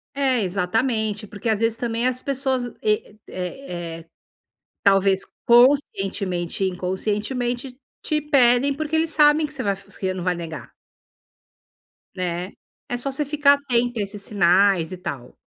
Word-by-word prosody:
É 265 -4 +2
exatamente 210 +3 -1
porque 205 +3 -4
às 220 -1 +1
vezes 230 0 +1
também 235 +1 -1
as 255 0 -1
pessoas, 265 -2 -1 0.2
eh 210 -1 -1
eh 175 -3 -6
eh, 165 - -14 0.8
talvez 195 -1 +4 0.2
conscientemente 195 - +2
e 190 - +2
inconscientemente 240 +8 -3 0.2
te 305 -1 0
pedem 275 -2 +3
porque 310 +2 -2
eles 325 0 +1
sabem 300 0 +4
que 295 - -11
você 270 -4 -4
vai 200 -1 +1
você 190 -1 -5
não 185 -1 -5
vai 180 -1 +1
negar. 160 -7 -8 1.4
Né, 180 0 -3 0.3
é 245 - -2
só 275 +3 -3
você 295 +3 -1
ficar 285 0 +4
atenta 245 -4 0
a - - +1
esses 200 0 -7
sinais, 190 -3 +3
e 185 - -5
tal. 130 -8 -7
220 Hz, 145 wpm, -23 LUFS, 185-265 Hz, 1.4 s, talvez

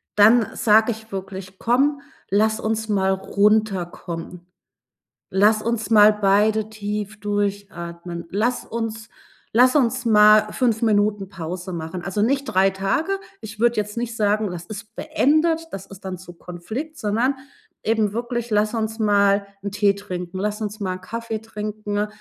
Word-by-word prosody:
dann 220 +2 +6
sage 220 +2 +4
ich 220 0 -9
wirklich: 190 0 -7
„Komm, 275 +4 +2 0.3
lass 220 +3 +2
uns 220 0 -2
mal 190 -2 +2
runterkommen. 190 -4 -1 0.8
Lass 210 +3 +3
uns 230 -2 -2
mal 215 -1 +7
beide 210 +1 +2
tief 210 -1 -5
durchatmen. 195 -4 -4
Lass 225 +6 -1
uns 225 -1 -5 0.4
lass 250 +4 +5
uns 250 -3 +2
mal 215 -1 +6
5 235 -4 +1
Minuten 205 -2 +2
Pause 180 0 -6
machen.“ 165 +2 -5
Also, 195 +2 -1
nicht 275 +5 +1
3 190 -2 +3
Tage, 195 - -1 0.2
ich 215 -1 -9
würde 240 0 +3
jetzt 210 +1 -2
nicht 235 -1 -3
sagen, 210 -1 +1
das 175 -1 -7
ist 215 +1 -9
beendet, 315 +2 +1
das 195 -1 -6
ist 195 0 -13
dann 185 -1 -4
zu 175 -1 -12
Konflikt, 215 - -7
sondern 235 +5 0 0.5
eben 215 -2 +1
wirklich: 240 0 -3
„Lass 210 +2 +2
uns 220 0 -2
mal 200 -1 +3 0.2
‘n 200 - -3
Tee 205 -1 +2
trinken, 185 -2 -6
lass 210 +2 -2
uns 210 +1 -4
mal 185 -2 -2
‘n 185 - -11
Kaffee 225 +2 -5
trinken, 210 -1 -4
210 Hz, 150 wpm, -22 LUFS, 195-225 Hz, 0.8 s, mal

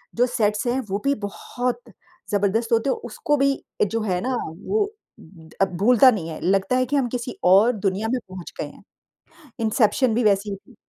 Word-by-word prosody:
जो 245 +1 +4
सेट्स 210 -2 0
हैं, 250 +2 +1
वो 200 +2 -1
भी 280 - +3
बहुत 245 +6 -4 0.5
ज़बरदस्त 205 +3 +1
होते 230 +4 +2
हैं। - - 0
उसको 295 +5 0
भी 275 0 +3 0.3
जो 225 +3 -2
है 185 -4 -1
ना 255 0 -1 0.3
वो 420 -1 +2 0.8
अब 190 -2 +1
भूलता 250 +4 +6
नहीं 170 -7 -4
है, 155 - -6
लगता 195 +7 +1
है 255 0 +2
कि 290 +4 -2
हम 265 -3 +2
किसी 245 0 -5
और 195 +7 +6
दुनिया 200 +1 -1
में 255 - 0
पहुँच 185 -2 -9
गए - - -1
हैं। - - -15 0.8
इंसेप्शन 225 +2 +2
भी 240 - +1
वैसी 205 0 +2
ही 200 - -3
थी। 225 +4 -19
225 Hz, 195 wpm, -23 LUFS, 195-250 Hz, 0.8 s, भूलता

